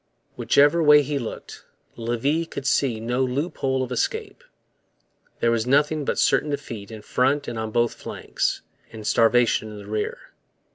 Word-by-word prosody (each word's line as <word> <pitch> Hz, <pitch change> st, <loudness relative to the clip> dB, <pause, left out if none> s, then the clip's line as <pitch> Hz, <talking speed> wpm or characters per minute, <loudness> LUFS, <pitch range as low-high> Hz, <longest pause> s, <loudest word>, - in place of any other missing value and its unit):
Whichever 145 Hz, +4 st, +4 dB
way 150 Hz, -1 st, +7 dB
he 145 Hz, 0 st, -2 dB
looked, 115 Hz, -, -8 dB, 0.3 s
Levis 130 Hz, +8 st, -1 dB
could 140 Hz, -, -7 dB
see 135 Hz, -4 st, +1 dB
no 120 Hz, +3 st, -1 dB
loophole 130 Hz, 0 st, -1 dB
of 130 Hz, -, -6 dB
escape. 125 Hz, -, -3 dB, 1.0 s
There 115 Hz, -, +3 dB
was 115 Hz, 0 st, 0 dB
nothing 150 Hz, +2 st, +2 dB
but -, -, -1 dB
certain 150 Hz, -, +2 dB
defeat 115 Hz, -8 st, -5 dB
in 110 Hz, -2 st, -9 dB
front 135 Hz, +5 st, +1 dB
and 115 Hz, -2 st, -4 dB
on 110 Hz, 0 st, -3 dB
both 120 Hz, +1 st, +1 dB
flanks, -, -, -3 dB, 0.3 s
and 110 Hz, -2 st, -9 dB
starvation 115 Hz, -1 st, +3 dB
in 105 Hz, -, -9 dB
the 100 Hz, -, -10 dB
rear. 105 Hz, +1 st, -4 dB
125 Hz, 155 wpm, -23 LUFS, 115-145 Hz, 1.0 s, way